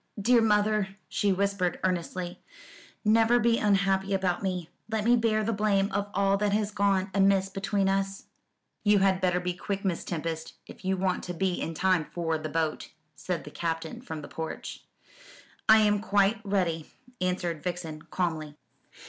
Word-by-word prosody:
"Dear 235 +3 +4
mother," 210 -2 +2
she 205 - +1
whispered 195 -2 0
earnestly, 180 -1 -2 0.6
"never 225 +2 +5
be 235 -1 +3
unhappy 195 -1 +2
about 185 -2 0
me. 180 -4 -2 0.2
Let 220 -1 -1
me 240 +1 +6
bear 225 -2 +2
the 230 +2 0
blame 200 -1 +1
of 200 +1 -1
all 195 0 +3
that 205 0 0
has 210 0 0
gone 200 -1 +1
amiss 195 0 +3
between 195 0 0
us." 195 0 -1 0.6
"You 205 -1 +5
had 190 -1 +3
better 180 -1 +2
be 180 0 -2
quick, 195 +2 -4
Miss 180 -3 -1
Tempest, 165 -1 -4
if - - -13
you 190 0 0
want 185 0 0
to 180 - -5
be 185 0 0
in 165 - -3
time 185 -2 +2
for 165 -1 -2
the 155 0 -5
boat," 160 0 -2 0.3
said 180 -3 -3
the 150 - -10
Captain 165 -1 -3
from 155 -2 -7
the - - -7
porch. 160 0 -6 0.9
"I 220 - +9
am 210 -1 +3
quite 205 +1 +2
ready," 180 -6 -1 0.3
answered 180 -3 -1
Vixen 165 -3 -4
calmly. 160 -2 -3
195 Hz, 165 wpm, -28 LUFS, 175-205 Hz, 0.9 s, I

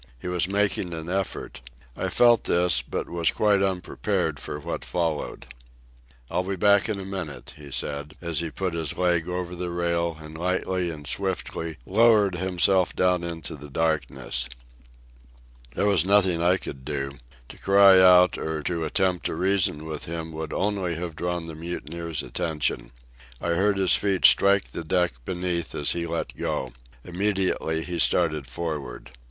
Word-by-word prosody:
He 90 - -7
was 90 -1 0
making 100 -3 0
an 80 +1 -6
effort. 95 0 -3 0.3
I - - -2
felt 120 -2 +4
this, 85 -1 +3
but - - -4
was 85 -2 0
quite 105 -2 +2
unprepared 95 -2 -1
for 75 - -6
what - - -5
followed. 85 -4 -3 0.9
"I'll 90 - +1
be 95 +1 -3
back 100 +3 +3
in 105 -2 -2
a 95 - -6
minute," 95 -6 -6
he 75 -1 -12
said, 75 +2 -3
as 85 -3 -1
he 85 -1 -2
put 95 +1 -3
his 80 -4 -1
leg 90 -1 +1
over 90 0 -3
the 90 0 -4
rail 85 -1 -1
and 75 0 -10
lightly 90 +1 -1
and 75 -3 -8
swiftly 85 -3 -2
lowered 105 -1 +4
himself 95 +1 +2
down 90 -1 +2
into 85 -2 -5
the 75 0 -11
darkness. 75 -5 -2 1.3
There - - +1
was 100 -6 +4
nothing 95 -3 +3
I 90 +2 +3
could 65 -7 -8
do. 70 -1 -3 0.4
To - - -12
cry 100 -1 +6
out 90 -1 +6
or 80 -1 -3
to 85 0 -2
attempt 90 +2 0
to - - -4
reason 90 -4 +2
with 80 -2 -5
him 80 0 -5
would 80 -1 -6
only 95 -4 -1
have 85 -1 -5
drawn 85 0 -3
the 80 - -7
mutineers' 85 0 -5
attention. 75 -8 -2 0.5
I 85 - -3
heard 100 +4 +2
his 95 -2 +4
feet 100 -2 +2
strike 100 0 +5
the - - -5
deck 90 -1 +1
beneath 90 -2 -2
as 70 - +2
he 85 -1 -2
let 85 0 -4
go. 65 -2 -3 0.3
Immediately 90 -4 0
he 85 0 -4
started 75 -6 +2
for'ard. 70 -4 -5
85 Hz, 165 wpm, -25 LUFS, 80-95 Hz, 1.3 s, cry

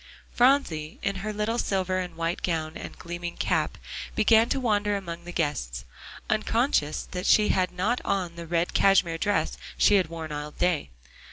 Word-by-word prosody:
Phronsie, 240 - +2
in 200 -1 -1
her 215 +3 -3
little 215 +3 -1
silver 185 -3 0
and 180 -2 -5
white 165 +1 -2
gown 160 -2 -2
and - - -8
gleaming 175 0 -6
cap, - - 0 0.4
began 225 +1 +5
to 270 - 0
wander 205 -4 +1
among 170 -3 -7
the 175 - -6
guests, 65 - -2 0.4
unconscious 215 - +1
that 180 +1 -3
she 210 -1 +5
had 185 -1 +2
not 205 +8 0
on 180 -4 -1
the 170 -1 -8
red 170 +1 0
cashmere 180 -4 +3
dress 205 +2 0 0.2
she 205 - +5
had 185 - +2
worn 160 -1 -6
all 150 0 -4
day. 160 - 0
180 Hz, 170 wpm, -27 LUFS, 165-210 Hz, 0.4 s, began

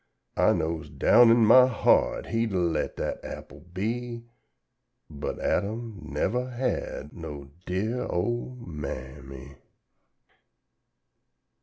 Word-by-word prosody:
I - - +4
knows 80 0 -2
down 120 -1 +6
in 115 0 +6
my 125 +4 +8
heart 125 - +2
he'd 115 -2 -1
a - - +1
let 85 -3 0
dat - - -2
apple - - -9
be, 115 +6 -4 0.9
But 75 -1 -4
Adam 110 +1 -2
nevuh 125 +11 -1
had 125 - -3
no 75 -4 -8 0.2
dear 110 +7 -1
old 120 +6 -2
Ma 75 -4 -5
am 65 +1 -7
my. 70 0 -11
100 Hz, 115 wpm, -27 LUFS, 75-120 Hz, 0.9 s, my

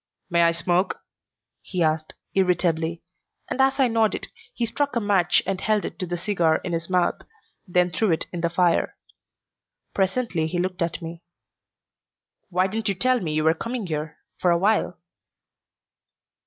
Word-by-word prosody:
"May 170 0 +4
I 170 0 +5
smoke?" 175 +2 0 0.6
he 180 -3 -1
asked, 155 0 0 0.2
irritably, 170 -3 +1 0.4
and 265 - 0
as 270 +1 +3
I 265 - +5
nodded 225 -2 +1 0.2
he 240 - -1
struck 285 +4 -1
a - - +3
match 195 -5 +3
and 190 -1 -2
held 215 -2 +1
it - - -7
to 185 - -2
the 175 +1 -2
cigar 175 -4 +2
in 180 - -3
his 165 +1 -2
mouth, 180 -1 +1 0.5
then 180 0 +2
threw 210 +6 +1
it 160 - +1
in 175 - -3
the 170 - +1
fire. 175 0 +1 1.0
Presently 190 -4 0
he 175 +2 -3
looked 185 +1 -2
at 170 +1 -2
me. 165 +1 -7 1.3
"Why 185 0 +2
didn't 215 +3 -2
you 195 - 0
tell 255 +5 +3
me 160 -6 -3
you 155 - +1
were 160 +1 +5
coming 230 +5 -4
here 155 -1 -4 0.2
for 180 - +2
a 170 - +4
while?" 205 +5 +1
180 Hz, 170 wpm, -24 LUFS, 170-205 Hz, 1.3 s, I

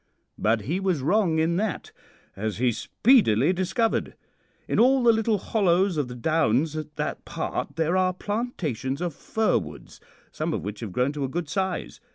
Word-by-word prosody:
But 110 +1 +2
he 160 - -2
was 185 -7 0
wrong 180 0 +2
in 165 +2 +1
that, 210 -4 -2 0.4
as 105 +1 -3
he 125 +1 +2
speedily 170 - +3
discovered. 190 +5 0 0.5
In - - 0
all 260 +2 +5
the 235 -1 +6
little 220 -1 +1
hollows 190 -2 +1
of 145 -4 -1
the 125 - -8
downs 155 +1 +1
at 155 -1 -6
that - - -3
part - - -4
there 165 +2 +1
are 185 -1 +3
plantations 180 - -3
of 175 -2 -2
fir 220 +8 0
woods, - - -11 0.3
some - - -2
of - - -4
which 105 +1 -5
have 110 -5 -6
grown 125 +8 +1
to 145 -1 -3
a 135 - -2
good 165 +3 -3
size. 190 +3 -3
170 Hz, 180 wpm, -25 LUFS, 130-200 Hz, 0.5 s, the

